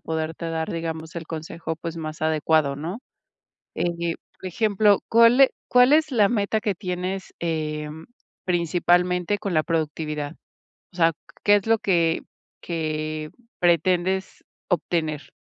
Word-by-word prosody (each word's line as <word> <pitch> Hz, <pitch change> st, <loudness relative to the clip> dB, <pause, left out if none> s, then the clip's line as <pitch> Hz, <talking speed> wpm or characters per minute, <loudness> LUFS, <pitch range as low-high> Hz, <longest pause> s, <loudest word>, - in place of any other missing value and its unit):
poderte 160 Hz, +1 st, -3 dB
dar, 160 Hz, 0 st, -2 dB
digamos, 160 Hz, -1 st, -5 dB
el 165 Hz, -1 st, -5 dB
consejo, 160 Hz, 0 st, -5 dB
pues, 165 Hz, +1 st, -6 dB
más 155 Hz, -1 st, -6 dB
adecuado, 155 Hz, -2 st, +2 dB
¿no?, 165 Hz, +8 st, -5 dB, 0.8 s
eh, 170 Hz, -1 st, -1 dB, 0.2 s
por -, -, -10 dB
ejemplo, 205 Hz, +1 st, +3 dB
¿cuál 230 Hz, +2 st, +6 dB
e 270 Hz, -, +7 dB, 0.2 s
cuál 250 Hz, +3 st, +6 dB
es 310 Hz, -1 st, +3 dB
la 210 Hz, -5 st, +4 dB
meta 215 Hz, -1 st, 0 dB
que 205 Hz, -3 st, -1 dB
tienes, 185 Hz, +1 st, -4 dB
em, 155 Hz, -1 st, -3 dB, 0.4 s
principalmente, 180 Hz, +2 st, +2 dB
con 195 Hz, -3 st, -3 dB
la 155 Hz, -, +3 dB
productividad? 150 Hz, -2 st, -2 dB, 0.6 s
O -, -, -21 dB
sea, 165 Hz, -1 st, +4 dB, 0.3 s
¿qué 205 Hz, -, +6 dB
es 205 Hz, +1 st, 0 dB
lo 225 Hz, 0 st, +4 dB
que 170 Hz, -5 st, +2 dB, 0.4 s
que 155 Hz, -2 st, -3 dB, 0.3 s
pretendes 180 Hz, +2 st, +1 dB, 0.2 s
obtener? 155 Hz, -4 st, -1 dB
170 Hz, 130 wpm, -24 LUFS, 160-190 Hz, 0.8 s, e